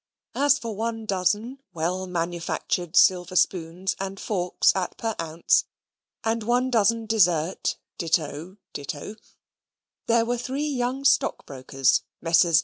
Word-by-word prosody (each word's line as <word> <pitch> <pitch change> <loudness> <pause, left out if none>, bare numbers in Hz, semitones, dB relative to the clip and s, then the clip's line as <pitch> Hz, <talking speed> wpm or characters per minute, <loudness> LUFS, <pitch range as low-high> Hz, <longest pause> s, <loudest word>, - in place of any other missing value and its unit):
As 285 +1 +3
for 230 -6 -5
one 225 +1 -3
dozen 210 +7 0 0.2
well 180 +3 -2
manufactured 175 0 -2
silver 180 0 +4
spoons 180 +1 0
and 195 0 -5
forks 180 -4 +1
at 185 -2 -3
per 225 -1 -2
oz., 165 0 +1 0.6
and 225 +1 0
one 245 +3 +1
dozen 230 0 +2
dessert 180 -6 +1 0.2
ditto 165 +2 -2 0.2
ditto, 150 +7 -6 0.9
there 230 0 +3
were 240 +1 -1
three 270 +4 -3
young 265 -1 -2
stockbrokers 135 - +1 0.2
(Messrs. 165 0 +4
190 Hz, 120 wpm, -25 LUFS, 170-230 Hz, 0.9 s, silver